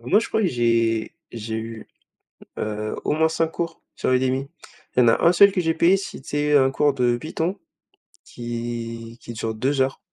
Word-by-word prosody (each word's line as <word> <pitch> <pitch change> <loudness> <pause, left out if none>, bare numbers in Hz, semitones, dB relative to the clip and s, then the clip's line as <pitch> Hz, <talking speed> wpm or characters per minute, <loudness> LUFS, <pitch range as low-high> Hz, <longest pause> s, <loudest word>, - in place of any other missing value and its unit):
Moi, 125 - +3
je - - -4
crois 220 - 0
que - - +3
j'ai 115 -2 +1 0.2
j'ai 110 -1 -5
eu, 115 0 -7 0.7
heu, 105 0 -3
au - - +2
moins 160 +1 +3
5 165 0 0
cours 165 -1 -4
sur - - -1
Udemy. 130 +1 +1 0.5
Il - - +3
y - - +7
en - - +4
a 115 - +3
1 170 - +6
seul 200 +3 +7
que 185 - 0
j'ai 165 -1 +1
payé, 175 +4 +4
c'était 145 -4 -2
un 135 -1 +5
cours 145 0 +2
de 120 -2 +1
Python 160 +6 -3 0.7
qui 115 -1 -6
qui 120 - -8
dure 110 0 -3
2 135 +4 0
heures. 135 0 0
130 Hz, 195 wpm, -23 LUFS, 115-160 Hz, 0.7 s, y